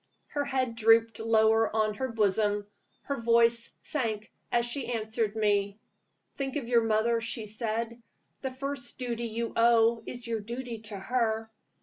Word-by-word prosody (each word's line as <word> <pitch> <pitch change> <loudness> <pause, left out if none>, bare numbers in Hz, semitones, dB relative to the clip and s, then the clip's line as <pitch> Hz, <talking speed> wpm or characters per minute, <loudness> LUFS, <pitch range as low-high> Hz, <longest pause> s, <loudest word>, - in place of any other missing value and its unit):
Her 290 -1 -1
head 260 -3 0
drooped 225 0 +4
lower 225 0 +4
on 215 -1 +2
her 260 +3 -3
bosom; 205 -1 +1 0.4
her 280 -4 -3
voice 230 0 +3
sunk 220 -7 -2 0.2
as 235 0 +2
she 245 +1 -3
answered 220 -1 -1
me. 205 -2 +1 0.6
"Think 270 -1 -3
of 275 -6 -2
your 235 -1 +4
mother," 225 +1 +2
she 230 -1 -3
said. 225 +2 -3 0.4
"The 265 - -2
first 265 -1 -4
duty 235 -2 -3
you 230 +1 -3
owe 230 0 +4
is 245 -1 -7
your 230 -1 -1
duty 235 +2 -5
to 205 - -5
her. 220 +1 -1
230 Hz, 150 wpm, -29 LUFS, 220-240 Hz, 0.6 s, drooped